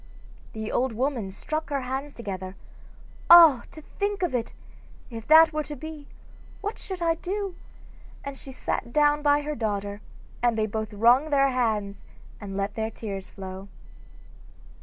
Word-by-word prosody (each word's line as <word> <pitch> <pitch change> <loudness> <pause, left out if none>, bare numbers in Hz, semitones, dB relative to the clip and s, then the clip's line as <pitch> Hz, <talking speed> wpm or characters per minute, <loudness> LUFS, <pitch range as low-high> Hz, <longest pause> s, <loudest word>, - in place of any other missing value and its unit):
The 220 0 -5
old 255 -1 0
woman 245 -3 -1
struck 310 +10 -4
her 280 -2 -1
hands 265 +3 -4
together: 190 -4 -6 0.7
'Ah, 330 -7 +9
to 310 - -12
think 405 +2 -3
of 345 - 0
it! 235 -2 -2 0.6
if 225 -1 -8
that 320 +1 +7
were 305 - 0
to 295 - -7
be, 305 0 -9 0.5
what 415 +2 -5
should 370 -3 -6
I 330 -1 +3
do?' 385 +3 -4 0.7
and 280 0 -6
she 270 - -10
sat 245 -2 -3
down 295 +1 +3
by 290 0 +3
her 300 +1 -3
daughter, 205 -3 -3 0.4
and 240 -2 +2
they 215 - +2
both 220 0 -4
wrung 240 +8 +4
their 275 -2 +3
hands 215 -6 -1 0.4
and 195 -2 -6
let 200 +1 -2
their 220 0 -2
tears 200 -4 -7
flow. 190 0 -8
255 Hz, 160 wpm, -26 LUFS, 215-300 Hz, 0.7 s, Ah